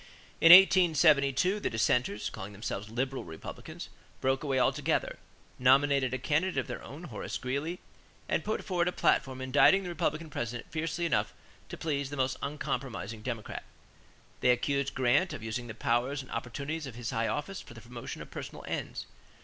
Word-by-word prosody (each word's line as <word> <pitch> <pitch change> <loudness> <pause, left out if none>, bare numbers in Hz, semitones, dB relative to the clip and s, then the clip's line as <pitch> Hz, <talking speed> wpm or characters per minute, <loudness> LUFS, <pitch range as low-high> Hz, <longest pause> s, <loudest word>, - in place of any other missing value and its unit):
In 165 - +9
1872, 175 -2 +6
the - - -1
dissenters, 110 -1 0
calling 100 +2 -7
themselves 105 0 -5
Liberal 130 +4 -2
Republicans, 80 0 -8 0.3
broke 135 +1 0
away 135 -3 +1
altogether, 125 - 0 0.4
nominated 135 0 +4
a 130 - -1
candidate 155 +6 0
of 130 - +1
their - - -6
own, - - -9
Horace - - -5
Greeley, 140 +8 -3 0.5
and - - 0
put 215 - -2
forward 180 -3 0
a - - +2
platform 130 -6 +1
indicting 145 +9 +5
the 180 - -5
Republican 160 -2 -2
President 120 -2 -4
fiercely 165 +2 -2
enough 110 -10 0 0.3
to - - -7
please 140 -4 -2
the 145 - -6
most 130 0 0
uncompromising 125 -6 -4
Democrat. 115 -2 -5 0.8
They - - +2
accused 140 +3 +1
Grant 130 +8 +2
of 110 - -7
using 115 +2 -4
"the 110 - -7
powers 125 +5 0
and - - -15
opportunities 140 +6 -4
of 125 - -9
his 120 -1 -4
high 115 0 0
office 185 +6 -3
for 120 - -13
the 115 - -11
promotion 120 +2 -7
of - - -17
personal - - -7
ends." - - -4
135 Hz, 170 wpm, -30 LUFS, 120-155 Hz, 0.8 s, In